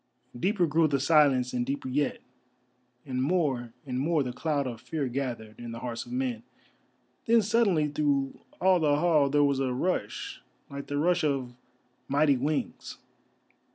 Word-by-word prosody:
Deeper 185 - +1
grew 160 +1 +3
the 140 -2 0
silence 135 -4 +3
and 125 -1 0
deeper 135 +2 -3
yet, 140 +2 -1 0.8
and 130 -2 -2
more 135 -6 0
and 125 -2 -3
more 155 +1 +1
the 125 -1 -4
cloud 145 0 -1
of 120 -3 -5
fear 140 +2 -3
gathered 120 -4 -4
in 120 -1 -7
the 115 - -7
hearts 120 - -5
of - - -11
men. 250 -2 -2 0.9
Then 230 -1 +5
suddenly 200 -8 +2
through 145 -2 0 0.2
all 185 0 +4
the 150 -3 +3
hall 150 -3 +3
there 145 +1 +3
was 140 -1 +2
a 130 -2 0
rush 125 - -2 0.3
like 140 0 -6
the 145 - -2
rush 175 +3 +2
of 135 -4 -1 0.5
mighty 145 +1 +3
wings. 145 +4 -3
145 Hz, 160 wpm, -28 LUFS, 130-160 Hz, 0.9 s, Then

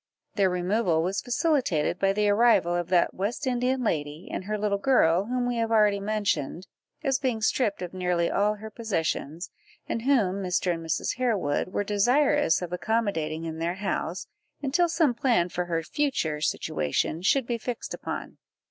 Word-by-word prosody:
Their 195 -3 +2
removal 180 -2 +1
was 190 +3 -1
facilitated 245 - 0
by 195 0 +3
the 210 +1 +1
arrival 205 -4 +4
of 175 0 -2
that 180 -2 +3
West 210 +9 -3
Indian 255 0 0
lady 150 -3 -2
and 185 - -4
her 215 +1 -2
little 205 -1 0
girl, 195 -7 +3
whom 245 +1 -1
we 245 -1 -1
have 230 -1 0
already 210 -3 +4
mentioned, 200 -6 -1 0.4
as 270 -3 +1
being 250 -4 -1
stripped 215 -3 0
of 175 - -6
nearly 180 -2 0
all 210 +3 +1
her 215 +1 -9
possessions, 170 - -3 0.4
and 230 - -2
whom 215 -8 +2
Mr. 180 -1 0
and 165 0 -6
Mrs. 160 +9 -2
Harewood 215 - 0
were 195 +2 -2
desirous 245 - +2
of 175 0 -5
accommodating 180 -6 -1
in 160 0 -5
their 170 +2 -1
house, 190 -2 -3 0.3
until 315 +5 +1
some 325 -5 +2
plan 235 -8 +1
for 180 0 -2
her 165 -2 -1
future 160 - -1
situation 80 - -1
should 260 +7 +2
be 235 -1 -2
fixed 240 +1 -5
upon. - - -6
200 Hz, 170 wpm, -26 LUFS, 175-240 Hz, 0.4 s, arrival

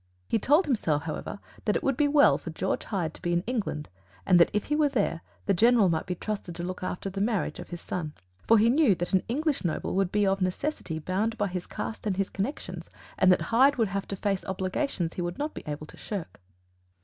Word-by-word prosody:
He - - +1
told 300 - +4
himself, 165 - +1
however, 160 +5 -5 0.3
that 210 - +2
it - - -1
would 275 - +2
be 290 +3 +3
well 285 0 +5
for - - -7
George - - -2
Hyde 175 -7 -2
to - - -12
be 175 -1 0
in 175 +1 +1
England, 210 -11 -2 0.4
and 180 -2 +6
that 170 - +6
if 210 - 0
he 295 - -1
were 300 -1 +3
there, 200 -10 0 0.2
the 200 - +3
General 225 0 +5
might 160 -1 -1
be 180 - -2
trusted 195 -2 -4
to 170 - -4
look 185 +1 -4
after 185 +1 -3
the 195 0 -3
marriage 215 -2 0
of - - -8
his 175 -1 -6
son. 155 -4 -4 0.3
For 225 - +7
he 215 +2 +5
knew 270 -7 +4
that 175 +2 -4
an 190 - +5
English 295 +4 0
noble 170 -3 -1
would 190 -1 +1
be 210 -1 +2
of 195 0 +1
necessity 185 - -2
bound 200 +8 -1
by 205 -2 0
his 180 -1 -4
caste 220 - -5
and 190 -3 0
his 195 -1 -1
connections, 205 +10 -4 0.3
and 185 -1 +6
that 180 - +4
Hyde 270 +4 +6
would 225 -4 +1
have 195 0 -3
to 195 - -4
face 195 -1 -1
obligations 190 - -2
he - - -4
would 175 0 -3
not 300 +2 -2
be - - -7
able 150 0 -4
to - - -14
shirk. 190 - -6
195 Hz, 240 wpm, -28 LUFS, 175-230 Hz, 0.4 s, For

